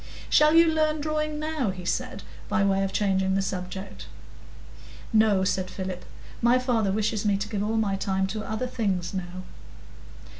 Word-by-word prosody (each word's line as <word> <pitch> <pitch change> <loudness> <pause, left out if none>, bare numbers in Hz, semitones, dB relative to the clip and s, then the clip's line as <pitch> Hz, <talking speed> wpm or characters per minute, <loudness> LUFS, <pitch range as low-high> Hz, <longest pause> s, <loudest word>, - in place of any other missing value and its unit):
"Shall 300 +1 +6
you 335 0 +8
learn 310 -1 +1
drawing 305 0 -1
now?" 305 -7 -1
he 185 -1 -6
said, - - -2 0.3
by 210 - +2
way 195 0 +2
of 195 - -1
changing 190 -2 +1
the 195 - +2
subject. 190 0 -5 1.1
"No," 215 -3 +4
said 185 0 0
Philip. 185 -1 -5 0.4
"My 240 +2 +5
father 240 -6 +1
wishes 215 +1 0
me 205 -2 +2
to 200 +1 -3
give 205 -2 -3
all 220 +2 0
my 200 -3 +1
time 190 0 0
to 215 -1 -4
other 220 +4 -3
things 195 -8 -2
now." 185 -1 -5
205 Hz, 165 wpm, -26 LUFS, 190-245 Hz, 1.1 s, you